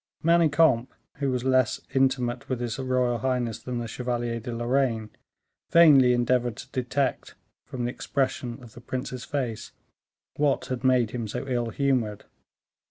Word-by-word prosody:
Manicamp, 160 Hz, -6 st, +4 dB, 0.3 s
who 140 Hz, -1 st, -1 dB
was 125 Hz, -1 st, -1 dB
less 130 Hz, -2 st, +2 dB
intimate 130 Hz, -2 st, 0 dB
with 130 Hz, -2 st, -1 dB
his 120 Hz, +1 st, -3 dB
royal 125 Hz, -2 st, 0 dB
highness 125 Hz, -2 st, -1 dB
than 125 Hz, -1 st, -4 dB
the 120 Hz, -1 st, -3 dB
Chevalier 120 Hz, 0 st, -3 dB
de 120 Hz, +2 st, -6 dB
Lorraine, 120 Hz, -2 st, 0 dB, 0.6 s
vainly 145 Hz, -7 st, +7 dB
endeavored 120 Hz, -1 st, +1 dB
to -, -, -9 dB
detect, 130 Hz, +1 st, -2 dB, 0.3 s
from 125 Hz, -3 st, -4 dB
the 120 Hz, -, -1 dB
expression 125 Hz, -3 st, -2 dB
of 115 Hz, -3 st, -13 dB
the 120 Hz, -, -12 dB
prince's 125 Hz, 0 st, -5 dB
face, 125 Hz, -6 st, -4 dB, 0.6 s
what 145 Hz, -2 st, +1 dB
had 130 Hz, 0 st, -4 dB
made 125 Hz, -4 st, +3 dB
him 120 Hz, -3 st, -4 dB
so 125 Hz, +5 st, -5 dB
ill 120 Hz, -3 st, -1 dB
humored. 120 Hz, -5 st, -1 dB
125 Hz, 150 wpm, -26 LUFS, 120-130 Hz, 0.6 s, vainly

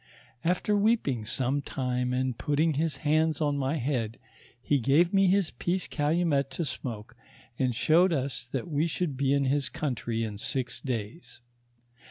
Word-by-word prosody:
After 180 Hz, +4 st, +1 dB
weeping 200 Hz, -, +1 dB
some 130 Hz, +5 st, 0 dB
time, 125 Hz, -2 st, -2 dB
and 130 Hz, -1 st, 0 dB
putting 150 Hz, +5 st, +1 dB
his 150 Hz, 0 st, -1 dB
hands 155 Hz, +1 st, +2 dB
on 145 Hz, -2 st, +1 dB
my 140 Hz, +1 st, 0 dB
head, 120 Hz, -5 st, -2 dB, 0.4 s
he 140 Hz, +3 st, +1 dB
gave 150 Hz, -, +3 dB
me 195 Hz, -1 st, +5 dB
his 190 Hz, -2 st, +2 dB
peace 180 Hz, +1 st, -2 dB
calumet 150 Hz, -2 st, +1 dB
to 170 Hz, -, -1 dB
smoke, 115 Hz, -6 st, -6 dB, 0.4 s
and 130 Hz, -3 st, +1 dB
showed 175 Hz, +9 st, +4 dB
us 135 Hz, -5 st, -2 dB
that 130 Hz, -, -4 dB
we 155 Hz, 0 st, +1 dB
should 165 Hz, -3 st, -2 dB
be 135 Hz, 0 st, +1 dB
in 140 Hz, 0 st, +2 dB
his 140 Hz, +1 st, +1 dB
country 120 Hz, -5 st, -2 dB
in 105 Hz, -2 st, -5 dB
six 125 Hz, +2 st, -2 dB
days. 120 Hz, +4 st, -5 dB
140 Hz, 160 wpm, -28 LUFS, 125-165 Hz, 0.4 s, me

